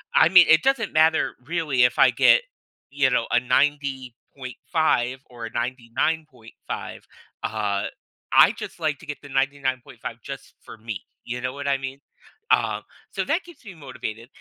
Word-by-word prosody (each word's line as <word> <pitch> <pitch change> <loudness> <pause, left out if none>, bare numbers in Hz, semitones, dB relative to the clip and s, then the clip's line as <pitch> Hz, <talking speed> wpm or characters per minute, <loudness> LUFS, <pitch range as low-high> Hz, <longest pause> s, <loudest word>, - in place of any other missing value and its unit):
I 160 - +6
mean, 180 -1 +8
it 160 +1 +6
doesn't 265 -8 +1
matter 160 +1 +3
really 150 -6 +1
if 125 - +2
I - - +7
get, - - +5 0.5
you 140 -1 +2
know, 120 -2 +1
a 120 - +4
90.5 130 0 -1
or 120 -2 -8
a 115 - -7
99.5, 125 +2 -4 0.4
uh, 105 -2 -1 0.5
I - - +8
just - - -8
like 155 -3 0
to 175 - -13
get 150 -1 -6
the 145 - -12
99.5 135 -2 -2
just - - -9
for - - -12
me. 110 -7 -6 0.2
You 125 +1 -5
know 125 +1 -3
what 140 0 -6
I 140 -1 +2
mean? 135 +1 -6 0.5
Uh, - - +2 0.3
so - - -2
that 335 +3 0
keeps 345 -7 -16
me 190 -3 -10
motivated, 125 -5 -7
135 Hz, 160 wpm, -24 LUFS, 125-155 Hz, 0.5 s, mean